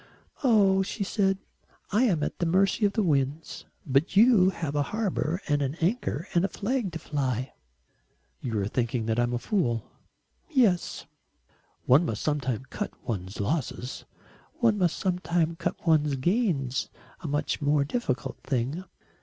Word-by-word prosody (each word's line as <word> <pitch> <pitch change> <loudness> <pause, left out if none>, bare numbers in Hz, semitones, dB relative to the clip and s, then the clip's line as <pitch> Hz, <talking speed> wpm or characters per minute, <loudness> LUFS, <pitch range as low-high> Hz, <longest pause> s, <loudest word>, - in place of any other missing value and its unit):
"Oh," 200 -6 +5
she 200 +2 -3
said, 195 -1 +1 0.5
"I 220 +6 +4
am 170 -10 +1
at - - -3
the 175 - +1
mercy 195 +5 +3
of 200 - -4
the 220 - +1
winds. 145 -1 -1 0.2
But 140 +6 +1
you 215 -4 +7
have 165 -6 -4
a 145 - +2
harbour 190 -6 -1
and 145 -2 +1
an 140 +1 -1
anchor 175 - -1
and 175 - +3
a - - +3
flag 220 -2 -2
to - - -3
fly." 130 -5 -2 0.9
"You 115 -4 -2
are 100 - -1
thinking 120 0 -1
that 115 +1 0
I'm 120 0 +2
a 120 - 0
fool." 120 - 0 0.7
"Yes." 235 - +2 0.8
"One 135 +7 +6
must 115 -9 -3
sometimes 130 -5 -1
cut 210 - -3 0.2
one's 95 -4 -4
losses." 125 +1 -3 0.5
"One 225 -4 +2
must 175 -3 +2
sometimes 175 -3 0
cut - - -1
one's 150 -3 +3
gains 150 - 0 0.3
a - - -6
much 145 +2 -1
more 145 0 +2
difficult 135 - -2
thing." 135 +6 -2
160 Hz, 155 wpm, -27 LUFS, 130-195 Hz, 0.9 s, you